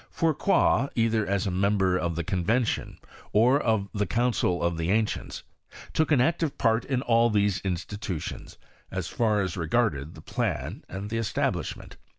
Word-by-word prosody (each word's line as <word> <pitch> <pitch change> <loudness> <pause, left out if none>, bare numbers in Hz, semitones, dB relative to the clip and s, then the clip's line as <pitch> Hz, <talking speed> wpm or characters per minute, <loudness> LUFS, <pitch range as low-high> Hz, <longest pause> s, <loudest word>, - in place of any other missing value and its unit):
JFourcroy, 160 -3 +2
either 115 -2 +1
as 100 -1 0
a 95 - -1
member 95 0 +2
of 85 -2 -1
the 85 - -2
Convention 105 +8 0 0.4
or 125 +7 +4
of 110 -4 +1
the 105 -1 -1
Council 115 -7 +1
of 85 0 +1
the 80 +1 -1
Ancients, 110 +2 -1 0.5
took 160 0 +1
an 145 - +5
active 160 +2 +1
part 115 -2 +2
in 130 -2 -1
all 115 -1 +4
these 100 -3 +1
institutions, 95 -2 -5 0.3
as - - -4
far 110 -3 +1
as 95 -3 -2
regarded 80 - 0
the 80 - -11
{^an - - -3
and 100 +3 -6
the 115 - 0
establishment. 115 - -2
105 Hz, 160 wpm, -27 LUFS, 95-120 Hz, 0.5 s, an